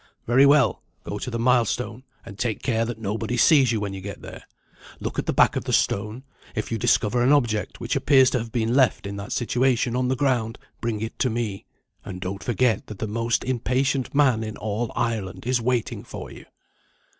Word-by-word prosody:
"Very 130 Hz, +4 st, +5 dB
well. 145 Hz, 0 st, +4 dB, 0.2 s
Go 105 Hz, -, -5 dB
to 125 Hz, -, -4 dB
the 115 Hz, -, -3 dB
milestone, 120 Hz, -1 st, +1 dB, 0.2 s
and 100 Hz, +1 st, -11 dB
take 115 Hz, -4 st, -2 dB
care 115 Hz, -3 st, +1 dB
that 120 Hz, -1 st, -5 dB
nobody 110 Hz, +3 st, -3 dB
sees 135 Hz, -1 st, +5 dB
you 110 Hz, -, 0 dB
when 100 Hz, -1 st, -3 dB
you 95 Hz, -, -7 dB
get 100 Hz, +1 st, -8 dB
there. -, -, -10 dB, 0.5 s
Look -, -, -4 dB
at -, -, -3 dB
the -, -, +2 dB
back -, -, +4 dB
of -, -, -3 dB
the -, -, -2 dB
stone. 105 Hz, +5 st, 0 dB, 0.3 s
If 110 Hz, -, -3 dB
you 115 Hz, -, -1 dB
discover 120 Hz, 0 st, +2 dB
an 125 Hz, +3 st, +4 dB
Object 120 Hz, -7 st, +1 dB
which -, -, -2 dB
appears 135 Hz, -3 st, +4 dB
to 125 Hz, -, +1 dB
have 115 Hz, 0 st, -6 dB
been 115 Hz, 0 st, 0 dB
left 130 Hz, -5 st, +3 dB
in 100 Hz, 0 st, -5 dB
that 100 Hz, +5 st, -7 dB
situation 125 Hz, 0 st, +1 dB
on 125 Hz, 0 st, +1 dB
the 130 Hz, -, +1 dB
ground, 125 Hz, -4 st, 0 dB, 0.2 s
bring 115 Hz, -3 st, -2 dB
it 110 Hz, -, -5 dB
to 130 Hz, -, +2 dB
me; 110 Hz, -4 st, -3 dB, 0.4 s
and 95 Hz, -2 st, -7 dB
don't 95 Hz, +2 st, -5 dB
forget 120 Hz, -2 st, +1 dB
that 105 Hz, -, -8 dB
the 110 Hz, -, -3 dB
most 115 Hz, +2 st, -1 dB
impatient 130 Hz, +2 st, 0 dB
man 130 Hz, -6 st, +3 dB
in 110 Hz, -1 st, -6 dB
all 110 Hz, +2 st, -3 dB
Ireland 110 Hz, -5 st, -2 dB
is 125 Hz, -1 st, +1 dB
waiting 120 Hz, -1 st, -1 dB
for -, -, -8 dB
you." -, -, -13 dB
115 Hz, 210 wpm, -24 LUFS, 110-125 Hz, 0.5 s, Very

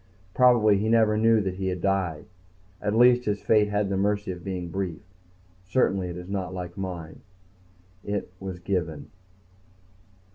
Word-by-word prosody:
Probably 115 Hz, -5 st, +5 dB
he 110 Hz, +2 st, 0 dB
never 110 Hz, -2 st, +4 dB
knew 110 Hz, 0 st, +4 dB
that 95 Hz, -2 st, -2 dB
he 95 Hz, 0 st, -2 dB
had 90 Hz, -1 st, -2 dB
died. 95 Hz, -4 st, -1 dB, 0.6 s
At 105 Hz, -, -1 dB
least 125 Hz, 0 st, +5 dB
his 105 Hz, -1 st, -2 dB
fate 105 Hz, -2 st, +3 dB
had 105 Hz, 0 st, 0 dB
the 95 Hz, -, -1 dB
mercy 100 Hz, 0 st, 0 dB
of 90 Hz, -1 st, -8 dB
being 90 Hz, -3 st, -4 dB
brief. 90 Hz, -2 st, -4 dB, 0.6 s
Certainly 95 Hz, -3 st, 0 dB
it 85 Hz, -, -6 dB
is 90 Hz, 0 st, -8 dB
not 95 Hz, -2 st, -4 dB
like 90 Hz, -1 st, -6 dB
mine. 90 Hz, -5 st, -6 dB, 0.8 s
It 100 Hz, -3 st, -3 dB
was... 95 Hz, -2 st, -6 dB
given 90 Hz, -4 st, -3 dB
95 Hz, 155 wpm, -26 LUFS, 90-105 Hz, 0.8 s, Probably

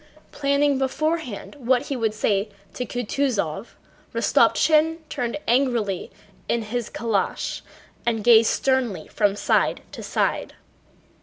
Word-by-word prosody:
Planning 280 Hz, -1 st, +1 dB
beforehand 295 Hz, -2 st, -2 dB
what 250 Hz, 0 st, +2 dB
he 280 Hz, -, -4 dB
would 220 Hz, -3 st, -1 dB
say 205 Hz, -1 st, 0 dB, 0.2 s
to 250 Hz, -, -4 dB
Kutúzov, 230 Hz, -, -2 dB, 0.4 s
Rostopchín 320 Hz, +1 st, +3 dB
turned 240 Hz, +2 st, -2 dB
angrily 235 Hz, -7 st, +1 dB, 0.4 s
in 235 Hz, -1 st, +1 dB
his 235 Hz, +1 st, -3 dB
calèche 220 Hz, -3 st, -2 dB, 0.4 s
and 225 Hz, -3 st, -1 dB
gazed 230 Hz, -1 st, +6 dB
sternly 250 Hz, -11 st, 0 dB
from 205 Hz, -2 st, +1 dB
side -, -, +1 dB
to -, -, -8 dB
side. -, -, -1 dB
240 Hz, 110 wpm, -23 LUFS, 215-270 Hz, 0.4 s, gazed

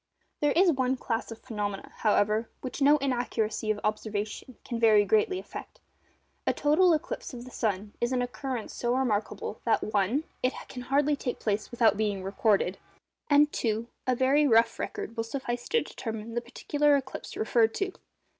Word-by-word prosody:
There 295 Hz, -1 st, +2 dB
is 360 Hz, +1 st, +5 dB
one 260 Hz, -2 st, 0 dB
class 230 Hz, -2 st, -2 dB
of 225 Hz, -, -7 dB
phenomena, 210 Hz, -5 st, -5 dB
however, 215 Hz, +1 st, +2 dB
which 260 Hz, +2 st, -6 dB
no 290 Hz, +2 st, +6 dB
inaccuracy 240 Hz, -5 st, -1 dB
of 215 Hz, -1 st, +1 dB
observation 215 Hz, +3 st, -3 dB
can 235 Hz, -2 st, -3 dB
very 215 Hz, -3 st, +5 dB
greatly 220 Hz, -, +2 dB
affect. -, -, -9 dB, 0.7 s
A -, -, +3 dB
total 330 Hz, +5 st, +4 dB
eclipse 300 Hz, -3 st, -5 dB
of 240 Hz, 0 st, -8 dB
the 255 Hz, -, -11 dB
sun 205 Hz, -3 st, -2 dB
is 240 Hz, +1 st, +1 dB
an 250 Hz, -1 st, +1 dB
occurrence 245 Hz, -1 st, -4 dB
so 240 Hz, 0 st, 0 dB
remarkable, 220 Hz, -4 st, -1 dB
that 230 Hz, -, +2 dB
(1) 215 Hz, +7 st, +1 dB, 0.2 s
it 255 Hz, -, +1 dB
can 250 Hz, -, -7 dB
hardly 285 Hz, +3 st, +2 dB
take 250 Hz, -3 st, -3 dB
place 210 Hz, 0 st, -1 dB
without 225 Hz, -4 st, +3 dB
being 205 Hz, -3 st, -1 dB
recorded, 195 Hz, -1 st, +1 dB, 0.5 s
and 295 Hz, 0 st, +5 dB
(2) 225 Hz, +1 st, -1 dB, 0.2 s
a 255 Hz, -, +3 dB
very 275 Hz, +4 st, +4 dB
rough 230 Hz, -2 st, +4 dB
record 230 Hz, -, -4 dB
will 225 Hz, -, -1 dB
suffice 240 Hz, 0 st, -4 dB
to 465 Hz, -, +3 dB
determine 225 Hz, -1 st, -6 dB
the 240 Hz, -, -1 dB
particular 290 Hz, +4 st, +1 dB
eclipse 265 Hz, -1 st, -4 dB
referred 225 Hz, 0 st, +2 dB
to. 390 Hz, -1 st, -1 dB
235 Hz, 170 wpm, -28 LUFS, 215-265 Hz, 0.7 s, no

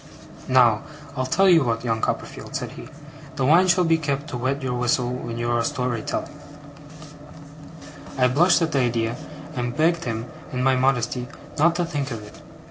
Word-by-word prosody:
'Now, 120 Hz, -4 st, +4 dB, 0.3 s
I'll 130 Hz, 0 st, -1 dB
tell 195 Hz, +8 st, +3 dB
you 170 Hz, -5 st, +6 dB
what, 115 Hz, -2 st, -1 dB
young 115 Hz, -2 st, -1 dB
Copperfield,' -, -, -4 dB
said -, -, -3 dB
he: -, -, -10 dB, 0.5 s
'the 130 Hz, -, 0 dB
wine 170 Hz, +6 st, +5 dB
shall 180 Hz, 0 st, +4 dB
be 165 Hz, -1 st, +3 dB
kept 145 Hz, 0 st, -2 dB
to 125 Hz, -, -4 dB
wet 135 Hz, +3 st, -2 dB
your 125 Hz, -1 st, -1 dB
whistle 125 Hz, 0 st, 0 dB
when 120 Hz, -2 st, -5 dB
you 120 Hz, 0 st, -1 dB
are 120 Hz, -1 st, +1 dB
story 125 Hz, -5 st, -2 dB
telling.' 145 Hz, +6 st, -5 dB, 1.8 s
I 125 Hz, -1 st, +4 dB
blushed 165 Hz, +7 st, +4 dB
at 165 Hz, -, -1 dB
the 140 Hz, -, +1 dB
idea, 115 Hz, -2 st, 0 dB, 0.4 s
and 120 Hz, +1 st, -3 dB
begged 165 Hz, +1 st, +2 dB
him, 115 Hz, -1 st, -3 dB, 0.3 s
in 125 Hz, 0 st, -2 dB
my 135 Hz, 0 st, +4 dB
modesty, 125 Hz, -1 st, 0 dB, 0.3 s
not 170 Hz, +3 st, +4 dB
to 175 Hz, 0 st, 0 dB
think 145 Hz, -4 st, -3 dB
of 115 Hz, -4 st, -6 dB
it. 105 Hz, -, -13 dB
130 Hz, 185 wpm, -23 LUFS, 120-155 Hz, 1.8 s, you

